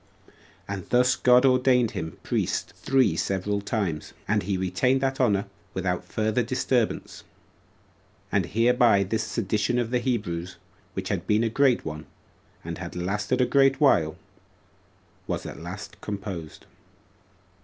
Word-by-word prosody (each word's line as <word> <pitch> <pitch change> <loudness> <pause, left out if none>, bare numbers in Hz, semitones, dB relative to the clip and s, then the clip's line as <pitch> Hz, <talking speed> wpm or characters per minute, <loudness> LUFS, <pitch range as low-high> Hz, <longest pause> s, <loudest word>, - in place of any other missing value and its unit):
And 100 -3 -6
thus 125 +1 +4
God 125 +1 +5
ordained 125 -2 +4
him 80 -5 -5
priest - - -1
three 130 -10 +2
several 95 +4 -1
times, 100 -7 -3
and - - +2
he 95 +1 -1
retained 95 +9 +1
that 135 0 0
honor 100 -5 +2 0.3
without 90 -1 -1
further 110 +2 0
disturbance. 125 -1 -1 1.1
And 95 -4 +1
hereby 115 0 +4
this 110 +3 -1
sedition 110 +1 -1
of 120 -1 -1
the 125 - +2
Hebrews, 90 -8 -2 0.4
which 95 0 -3
had 95 -4 -2
been 105 +2 +3
a 115 - +1
great 130 +1 +2
one, 75 0 -6 0.6
and - - -6
had - - -7
lasted 105 +7 -1
a - - +5
great 135 0 +3
while, 85 - +3 1.1
was - - -3
at - - -7
last - - -8
composed. 100 -6 -6
110 Hz, 135 wpm, -26 LUFS, 95-125 Hz, 1.1 s, God